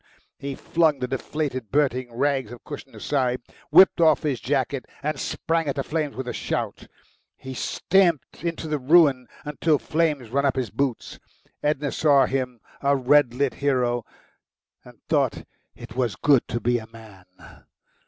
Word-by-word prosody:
He 140 -1 -5
flung 160 -1 +1
the 125 - -3
deflated 135 -3 -3
burning 130 -3 0
rags 135 +1 0
of 120 - -11
cushion - - -9
aside, 130 -3 0 0.3
whipped 175 +3 +6
off 160 -2 +4
his 140 -6 -1
jacket 135 0 -1 0.2
and 150 +1 -2
sprang 165 -1 -1
at 140 - -1
the 135 - -1
flames 150 -1 -2
with 130 -1 -5
a - - -3
shout. - - -3 0.5
He 130 - -8
stamped 170 +2 +1
into 165 -1 -3
the 150 -1 -1
ruin 140 -3 +4 0.2
until 150 +1 +1
flames 145 -1 -1
ran 140 +2 +1
up 140 -2 +2
his 125 -6 -2
boots. 135 -4 -3 0.4
Edna 145 -1 0
saw 145 -3 +4
him, 125 -3 -3 0.2
a 140 0 +3
red 135 -1 +3
lit 140 0 0
hero, 125 -4 0 0.8
and - - -16
thought - - +1 0.3
it 115 - -11
was 125 -4 0
good 140 -4 +3
to 120 - -2
be 120 +2 +1
a 110 - -11
man. 110 -5 -15
140 Hz, 160 wpm, -24 LUFS, 125-150 Hz, 0.8 s, whipped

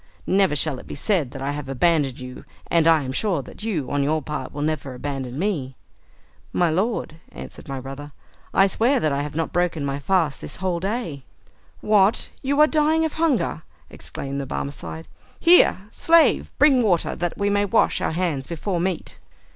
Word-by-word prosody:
Never 190 -5 +3
shall 145 -2 0
it - - -13
be - - -6
said 160 - 0
that 135 +1 -7
I 140 - -1
have 145 -2 -6
abandoned 140 -1 +1
you, 125 0 -9 0.3
and 165 -1 +4
I 160 -3 +5
am 130 - -4
sure 175 0 -1
that - - -12
you, 190 - -2
on 145 - +1
your 155 +3 +1
part, 135 -3 -5
will 145 - -4
never 150 -4 -2
abandon 135 -1 -5
me." 155 -8 -2 0.8
"My 175 -2 +2
lord," 190 -2 -1
answered - - -10
my 135 -1 -4
brother, 135 +3 -8 0.4
"I 195 - +5
swear 235 +7 +2
that 155 - +1
I 140 0 0
have 145 0 -5
not 165 0 -2
broken 175 -4 0
my 140 0 -2
fast 160 -2 0
this - - -7
whole 180 -2 -2
day." 190 - -3 0.6
"What, 210 0 +3
you 280 +2 0
are - - +9
dying 315 +1 +2
of 315 - -3
hunger?" 315 - 0 0.3
exclaimed 140 0 -6
the 135 - -6
Barmecide. 80 - -5 0.3
"Here, 340 - +6
slave; 325 -3 +3
bring 275 -3 +5
water, 185 -7 +1
that 175 -1 -3
we 200 0 +1
may 205 0 +2
wash 195 - +2
our - - -1
hands 160 -6 -1
before 175 +2 -3
meat!" 180 -1 -3
165 Hz, 185 wpm, -23 LUFS, 140-200 Hz, 0.8 s, are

